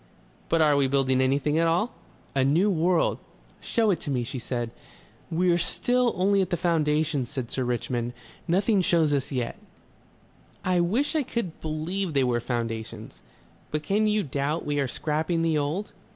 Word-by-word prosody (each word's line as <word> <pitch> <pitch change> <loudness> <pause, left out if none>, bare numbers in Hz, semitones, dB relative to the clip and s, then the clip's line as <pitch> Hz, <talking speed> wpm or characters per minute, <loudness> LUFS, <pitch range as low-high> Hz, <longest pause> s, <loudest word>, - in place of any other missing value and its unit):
"But 165 -1 +4
are 150 -1 +4
we 140 -1 +3
building 130 -1 +2
anything 140 +4 +2
at 165 - +3
all?" 180 +9 +1 0.4
"A 135 -1 +2
new 165 +10 +3
world." 175 0 +2 0.4
"Show 225 -3 +1
it 175 - -3
me," 130 -4 0
she 125 +2 -5
said. 120 -1 -3 0.6
"We're 175 +1 +2
still 245 +5 +1
only 195 +2 +3
at 185 - -1
the 175 - 0
foundations," 155 -5 +1
said 130 -4 -4
Sir 130 - -1
Richmond. 120 0 -2 0.3
"Nothing 195 +4 +3
shows 165 -4 +3
as 140 -1 -1
yet." 125 -3 -3 1.1
"I 185 -1 +2
wish 230 - +1
I 310 - +3
could 235 - -4
believe 160 +3 -2
they 135 - +4
were 120 -2 +1
foundations." 115 -2 -4 0.5
"But 155 0 -2
can 210 +6 +2
you 210 -1 +2
doubt 145 +2 -2
we 145 0 0
are 140 - +1
scrapping 160 +5 -1
the 160 -2 +2
old?..." 155 +9 -2
155 Hz, 165 wpm, -26 LUFS, 135-180 Hz, 1.1 s, But